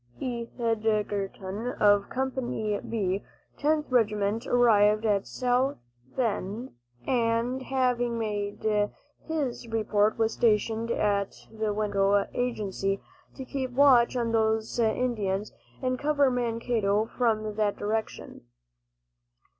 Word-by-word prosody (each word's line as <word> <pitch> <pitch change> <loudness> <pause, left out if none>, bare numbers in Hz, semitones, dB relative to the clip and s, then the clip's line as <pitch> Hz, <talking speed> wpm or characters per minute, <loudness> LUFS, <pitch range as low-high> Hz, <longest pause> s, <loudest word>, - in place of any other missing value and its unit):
Edgerton 220 -3 -2
of 205 -1 +4
Company 250 -5 -2
"B," 200 -3 -2 0.4
Tenth 300 -1 +1
Regiment, 220 -1 +1
arrived 215 -3 +4
at 200 -2 +1
South 255 +2 0 0.4
Bend, 225 0 -2 0.3
and 235 +1 +1
having 250 -3 0
made 205 -2 -3 0.6
his 285 -7 -2
report, 215 -1 +1
was 225 0 +1
stationed 225 0 +1
at 200 -3 0 0.2
the 220 -1 -2
Winnebago 205 -1 +1
agency, 195 -5 -1 0.4
to 265 - -7
keep 260 0 -3
watch 255 -3 +5
on 235 -2 0
those 220 0 +1
Indians 220 -4 0 0.3
and 255 -1 0
cover 285 -2 +2
Mankato 230 -3 0
from 215 -3 -1
that 210 -2 +1
direction. 220 +1 -4
225 Hz, 100 wpm, -27 LUFS, 210-245 Hz, 0.6 s, watch